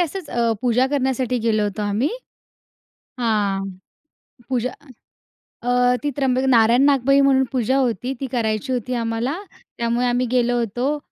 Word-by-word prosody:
असच 350 -1 -3
अ, 235 -1 +1
पूजा 250 +1 +3
करण्यासाठी 260 -3 0
गेलो 220 -2 +1
होतो 205 0 -2
आम्ही. 205 +7 0 1.1
हां, 205 -4 0 0.8
पूजा 250 -1 -1 0.9
अ, 245 +1 +2
ती 295 - 0
त्र्यंबक 260 -2 +1
नारायण-नागबळी 265 +4 +4
म्हणून 270 -1 +4
पूजा 260 0 +1
होती 255 0 -1
ती 270 - -3
करायची 225 +1 -1
होती 250 0 -2
आम्हाला, 230 +4 -2 0.4
त्यामुळे 235 +1 0
आम्ही 245 +1 +1
गेलो 245 -1 +2
होतो. 245 +6 -1
245 Hz, 130 wpm, -21 LUFS, 230-265 Hz, 1.1 s, नारायण-नागबळी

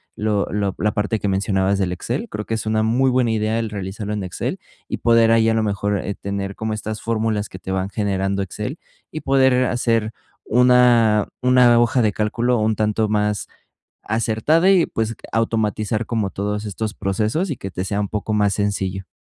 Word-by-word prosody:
lo 105 -2 0
lo 100 -2 -1
la 105 - +1
parte 105 +2 -1
que 105 - -2
mencionabas 95 0 +1
del 95 -2 0
Excel, 90 - -3
creo 105 0 -5
que 115 - -1
es 110 - -4
una 110 0 +1
muy 125 +4 +2
buena 125 -2 +2
idea 110 +1 0
el 115 -1 -2
realizarlo 100 +1 -5
en 105 -2 -3
Excel 90 - -4 0.3
y - - -3
poder 115 -1 +4
ahí, 115 0 +4
a - - +2
lo 110 - +1
mejor, 100 -1 -1
eh, 100 - -4
tener 100 0 -4
como 110 0 -3
estas 110 0 -5
fórmulas 110 -2 -1
que 95 - -11
te 95 - -6
van 95 0 -1
generando 100 -2 -1
Excel 105 - -5 0.3
y 155 - -5
poder 130 -2 +3
hacer 115 -3 0 0.3
una 120 -3 +4 0.2
una 125 -2 +5
hoja 120 +1 +3
de 110 -2 +2
cálculo 115 +4 0
un 110 0 +1
tanto 110 0 0
más 105 -1 0 0.6
acertada 115 - +2
y, 185 -4 +4
pues, 115 0 -3 0.2
automatizar 110 -1 0
como 110 -4 -1
todos 105 +2 -3
estos 105 +2 -4
procesos 110 - -1
y 140 - -2
que 95 -4 -7
te 90 - -3
sea 100 +1 -2
un 100 - -2
poco 105 +1 -3
más 105 -2 +2
sencillo. 95 -2 -2
110 Hz, 195 wpm, -21 LUFS, 100-115 Hz, 0.6 s, una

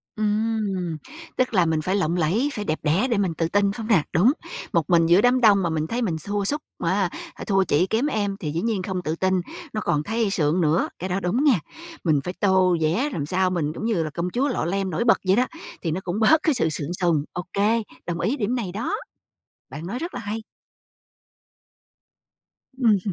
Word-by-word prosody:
Ừm, 210 -5 -1 0.4
tức 255 -2 +1
là 180 -4 +4
mình 160 -1 +1
phải 185 +5 0
lộng 175 -3 +1
lẫy, 195 - +1
phải 210 -1 -4
đẹp 155 - -1
đẽ 165 - +2
để 230 - +1
mình 190 -4 +1
tự 165 0 -1
tin, 200 +3 +2
phải - - -6
hông 220 -2 -5
nè? 190 -10 +4
Đúng, 205 +11 +5 0.4
một 165 -2 +1
mình 170 -2 +5
giữa 175 +4 +5
đám 250 +1 +3
đông 205 -4 +5
mà 170 - +1
mình 160 -1 -1
thấy 245 +2 -2
mình 175 -8 0
xua 200 +5 -2
sút, 295 +7 -1 0.2
á, 185 +1 +1 0.2
à, - - -9
thua 195 -2 +3
chị 180 +1 +2
kém 225 +5 +1
em 205 -8 -1
thì 150 -5 -3
dĩ 165 - -2
nhiên 220 -4 0
không 185 -1 -3
tự 155 +1 -1
tin, 190 +2 +1 0.4
nó 215 - -2
còn 150 0 0
thấy 225 +1 0
sượng 165 -1 +1
nữa, 160 +1 +2
cái 185 - -4
đó 185 - 0
đúng 195 +10 0
nghe. 255 - +4 0.4
Mình 155 -4 +3
phải 180 - -4
tô 190 -2 +4
vẽ 185 - +1
làm 145 - -2
sao 185 +4 +1
mình 160 -4 -1
cũng 220 - -5
như 210 -8 +1
là 155 - -3
công 170 +4 -3
chúa 260 +8 0
Lọ 250 - -1
Lem 195 +2 -1
nổi 175 +5 -1
bật 230 - +5
vậy 190 - +5
đó, 250 +2 +2 0.3
thì 165 - -1
nó 185 +4 -2
cũng 180 +4 -2
bớt 310 +8 +5
cái 315 - +3
sự 165 -10 +1
sượng 155 +2 -3
sùng, 165 -5 +2
OK, 180 +2 -6 0.5
đồng 170 -1 -3
ý 255 +11 0
điểm 225 +3 0
này 210 -8 -3
đó, 235 - -2 0.7
bạn 160 +3 -7
nói 240 +6 -4
rất 340 +2 -5
là 250 - -4
hay. 220 0 -4 2.3
Ừm, 240 -5 +3
ừ. 200 - 0
190 Hz, 230 wpm, -24 LUFS, 170-220 Hz, 2.3 s, Đúng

